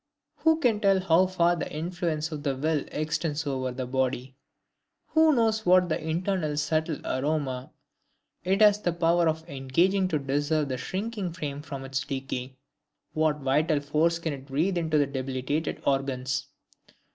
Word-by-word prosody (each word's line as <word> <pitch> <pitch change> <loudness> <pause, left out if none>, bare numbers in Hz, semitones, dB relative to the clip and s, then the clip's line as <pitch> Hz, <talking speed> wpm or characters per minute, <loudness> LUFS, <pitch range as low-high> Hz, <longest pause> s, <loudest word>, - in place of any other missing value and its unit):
Who 320 0 +3
can 240 -8 +2
tell 195 -2 +4
how 185 0 +4
far 175 -1 +2
the 170 - -4
influence 160 -1 -2
of 150 -2 -5
the 140 -2 -1
will 150 +2 0
extends 155 0 -2
over 130 -2 -2
the 130 +1 -4
body? 130 0 -2 0.7
Who 315 0 +5
knows 220 -2 +2
what 180 -2 +4
internal 160 -1 -1
subtle 155 +1 0
aroma 135 -2 -1 0.7
it 190 +4 +1
has 210 -1 +6
the 175 - 0
power 170 0 +2
of 160 0 -2
disengaging 170 +7 +1
to 155 -4 0
preserve 145 +2 0
the 130 - -2
sinking 195 - -3
frame 145 -5 -5
from 135 -2 -7
decay; 135 -1 -4 0.6
what 155 -1 +1
vital 150 +3 +2
force 155 +4 +1
it - - -14
can 145 -5 -3
breathe 155 +7 0
into 160 -2 +1
the 145 - +4
debilitated 135 +3 -3
organs? 135 -1 -1
155 Hz, 150 wpm, -27 LUFS, 135-175 Hz, 0.7 s, has